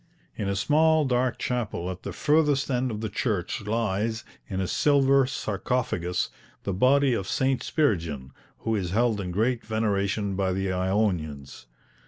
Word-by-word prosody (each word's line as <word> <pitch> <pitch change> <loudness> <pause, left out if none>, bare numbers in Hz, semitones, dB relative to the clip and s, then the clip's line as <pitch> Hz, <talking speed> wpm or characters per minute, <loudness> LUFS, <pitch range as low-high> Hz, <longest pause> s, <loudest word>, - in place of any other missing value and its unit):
In 100 - -2
a 100 - 0
small 155 +9 +3
dark 125 -1 +1
chapel 105 -7 -2
at 95 0 -8
the - - -5
furthest 150 -2 +2
end 125 0 +1
of 110 -2 -4
the 110 - -1
church 105 -3 -2
lies, 110 0 -1 0.2
in 95 -2 -3
a 95 - 0
silver 140 0 +3
sarcophagus, 95 -6 -2 0.3
the 100 - -2
body 130 +6 +4
of 95 -5 -2
St. 135 -1 +1
Spiridion, 80 - -1 0.3
who 115 - 0
is 95 -4 -2
held 110 +1 +1
in 90 - -4
great 115 +6 0
veneration 100 -2 -1
by 95 -1 0
the 95 0 -1
Ionians. 90 - -1
110 Hz, 155 wpm, -26 LUFS, 95-130 Hz, 0.3 s, body